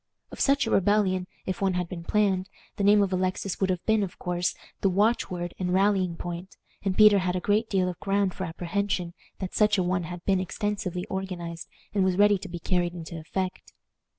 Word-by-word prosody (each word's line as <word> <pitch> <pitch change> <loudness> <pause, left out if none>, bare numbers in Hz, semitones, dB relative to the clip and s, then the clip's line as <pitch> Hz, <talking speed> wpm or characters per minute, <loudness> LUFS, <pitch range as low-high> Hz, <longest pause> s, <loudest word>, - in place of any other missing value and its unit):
Of - - -9
such 275 -2 +3
a 225 - -2
rebellion, 190 -2 +2 0.2
if 185 0 -3
one 190 -2 +2
had 180 -1 -1
been 170 -1 -7
planned, 195 -1 +1 0.3
the 200 - -2
name 205 +1 +6
of 190 -1 -1
Alexis 185 +1 -1
would 190 - +2
have 180 -2 -1
been, 220 -1 +3
of 190 -3 -4
course, 175 -1 -1 0.2
the 195 - +2
watch 210 +6 +2
word 175 -1 -4
and 180 -1 -1
rallying 190 -2 +2
point, 175 +2 -7 0.2
and 195 -2 -1
Peter 210 -2 +8
had 180 -1 -1
a - - 0
great 210 +4 +1
deal 185 -2 +2
of 180 -2 -4
ground 195 -1 +1
for 185 - -4
apprehension 175 +1 -2 0.2
that 185 -2 -5
such 210 -1 +3
a 185 - +2
one 180 -1 0
had 175 +1 -8
been 190 -2 +3
extensively 185 -1 -3
organized 175 -3 -5 0.3
and 200 -2 +2
was 185 -1 +1
ready 205 -1 +5
to 195 - -8
be 175 - -5
carried 175 0 0
into 165 -1 -7
effect. 185 +4 -4
185 Hz, 210 wpm, -27 LUFS, 180-200 Hz, 0.3 s, Peter